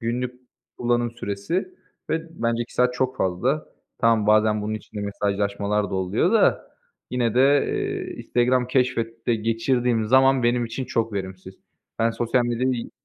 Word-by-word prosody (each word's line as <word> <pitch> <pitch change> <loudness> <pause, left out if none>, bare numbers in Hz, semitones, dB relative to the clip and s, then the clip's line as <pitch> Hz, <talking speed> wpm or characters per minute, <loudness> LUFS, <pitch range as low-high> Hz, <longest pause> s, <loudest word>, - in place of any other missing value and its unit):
Günlük 125 +2 -3 0.4
kullanım 120 -1 0
süresi 115 - -3 0.4
ve 165 -4 -4
bence 115 0 +1
2 120 - -12
saat 125 0 +2
çok 130 +1 -1
fazla. 125 +12 0 0.3
Tamam, 115 -3 +3
bazen 105 0 +3
bunun 110 +1 -2
içinde 105 0 -7
mesajlaşmalar 100 0 -1
da - - -3
oluyor 95 - +1
da, 225 - +2 0.4
yine 120 -2 0
de, 125 - +4 0.3
eee, 400 -3 -3
Instagram 125 +1 +1
Keşfet'te 120 -3 0
geçirdiğim 115 +1 0
zaman 130 +1 +4
benim 120 0 +2
için 115 +3 -4
çok 115 -3 -1
verimsiz. 95 -1 -6 0.4
Ben 115 0 +2
sosyal 120 +2 0
medyayı 120 +1 -1
120 Hz, 145 wpm, -23 LUFS, 105-125 Hz, 0.4 s, de